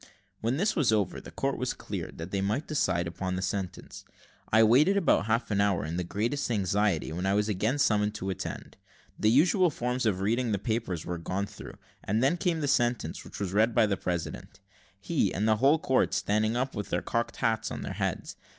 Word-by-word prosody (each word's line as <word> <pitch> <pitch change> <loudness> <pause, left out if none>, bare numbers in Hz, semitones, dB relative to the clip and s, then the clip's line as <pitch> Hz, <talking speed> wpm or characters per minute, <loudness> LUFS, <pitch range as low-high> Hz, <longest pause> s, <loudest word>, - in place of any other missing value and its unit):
When 115 +4 0
this 200 +6 +1
was 145 -9 +3
over, 105 -4 0
the - - -11
court - - -2
was - - -2
cleared, - - -6
that 80 +3 -7
they 100 - -1
might 105 +10 -1
decide 85 - 0
upon 90 +2 -3
the 95 - -3
sentence. 95 -1 -4 0.5
I 110 +1 +6
waited 145 - +5
about 165 - +2
half 115 +1 0
an 100 -1 +2
hour 100 -6 +1
in 80 +3 -4
the 90 - -1
greatest 115 +11 -2
anxiety, 100 -5 +1
when 90 +3 -2
I 100 - +2
was 105 0 +1
again 110 +6 0
summoned 105 -5 +2
to 95 -2 -3
attend. 95 - -6 0.4
The 110 - +3
usual 175 - +4
forms 125 -3 -1
of 95 -3 0
reading 115 +3 +1
the - - +1
papers 105 -5 -2
were 85 -1 -4
gone 95 +4 -2
through, 95 - -11 0.3
and 110 +5 0
then 140 +6 +3
came 170 -2 0
the 145 - 0
sentence, 120 -3 0
which - - -10
was 95 -2 -3
read 110 +3 +3
by - - +5
the 100 -2 0
president, 90 -3 -4 0.4
he - - 0
and 105 +4 -1
the 110 -1 +3
whole 140 +7 +4
court 130 -4 +1
standing 110 +3 +1
up 130 +2 -1
with 105 - -4
their 85 - -1
cocked 115 0 -2
hats 115 -1 0
on - - -5
their - - -4
heads. - - -3
110 Hz, 215 wpm, -28 LUFS, 95-125 Hz, 0.5 s, I